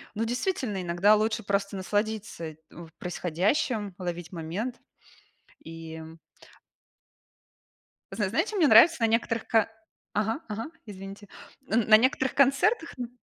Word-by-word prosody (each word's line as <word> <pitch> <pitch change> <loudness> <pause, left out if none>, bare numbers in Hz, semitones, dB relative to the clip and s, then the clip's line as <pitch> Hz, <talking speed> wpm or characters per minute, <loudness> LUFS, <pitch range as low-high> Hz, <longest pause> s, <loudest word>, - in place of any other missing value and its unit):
Ну, 225 - -1
действительно, 245 - -2
иногда 180 +5 +4
лучше 220 +1 0
просто 200 0 -1
насладиться 205 -4 -3
в 170 -1 -11
происходящим, 195 - -1
ловить 175 -1 -5
момент, 185 +9 -4 0.9
и, 165 0 -9
м 160 +1 -10 1.9
Зна - - -1
знае - - +1
чё 430 - -5
мне 320 -6 +5
нравится 290 +10 +8
на 230 - +4
некоторых 230 0 0
ко 225 -1 +3 0.4
Ага, 220 +7 -1
ага. 215 +2 -4 0.2
Извините. 195 0 -10 0.4
Н 225 0 +2
на 215 - +9
некоторых 260 +2 +1
концертах, 280 - +3
н 240 -1 -4
210 Hz, 125 wpm, -27 LUFS, 180-230 Hz, 1.9 s, на